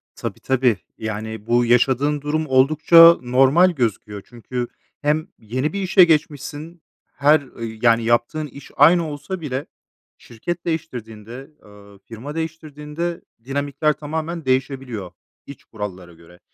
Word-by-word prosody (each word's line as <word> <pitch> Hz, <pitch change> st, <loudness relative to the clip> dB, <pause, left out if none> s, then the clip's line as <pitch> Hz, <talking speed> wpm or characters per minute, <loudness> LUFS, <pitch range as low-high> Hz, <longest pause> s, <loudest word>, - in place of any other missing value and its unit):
Tabii, -, -, -6 dB
tabii. 125 Hz, -5 st, +1 dB, 0.2 s
Yani, 110 Hz, 0 st, -6 dB
bu 120 Hz, 0 st, +3 dB
yaşadığın 135 Hz, +4 st, +2 dB
durum 155 Hz, +2 st, -1 dB
oldukça 155 Hz, +5 st, +6 dB
normal 135 Hz, +9 st, +4 dB
gözüküyor. 105 Hz, -, -3 dB
Çünkü 120 Hz, +1 st, -5 dB, 0.3 s
hem 150 Hz, +2 st, 0 dB
yeni 130 Hz, -, -3 dB
bir 200 Hz, -, -3 dB
işe 185 Hz, 0 st, +5 dB
geçmişsin, 155 Hz, +1 st, -1 dB, 0.3 s
her 145 Hz, +2 st, +4 dB
ı 125 Hz, -3 st, -11 dB, 0.2 s
yani 115 Hz, -1 st, +4 dB
yaptığın 120 Hz, +7 st, 0 dB
iş 140 Hz, -1 st, -13 dB
aynı 165 Hz, +3 st, +5 dB
olsa 165 Hz, +5 st, -6 dB
bile 135 Hz, -2 st, -4 dB, 0.5 s
şirket 170 Hz, +10 st, -6 dB
değiştirdiğinde, 125 Hz, -5 st, -6 dB
ııı, 100 Hz, -1 st, -17 dB
firma 115 Hz, +9 st, -9 dB
değiştirdiğinde 160 Hz, +1 st, -5 dB, 0.2 s
dinamikler 145 Hz, +3 st, -1 dB
tamamen 160 Hz, +1 st, -5 dB
değişebiliyor 130 Hz, -6 st, -2 dB, 0.3 s
iç 140 Hz, -, -12 dB
kurallara 95 Hz, -5 st, -8 dB
göre. 85 Hz, +2 st, -19 dB
135 Hz, 125 wpm, -21 LUFS, 115-155 Hz, 0.5 s, oldukça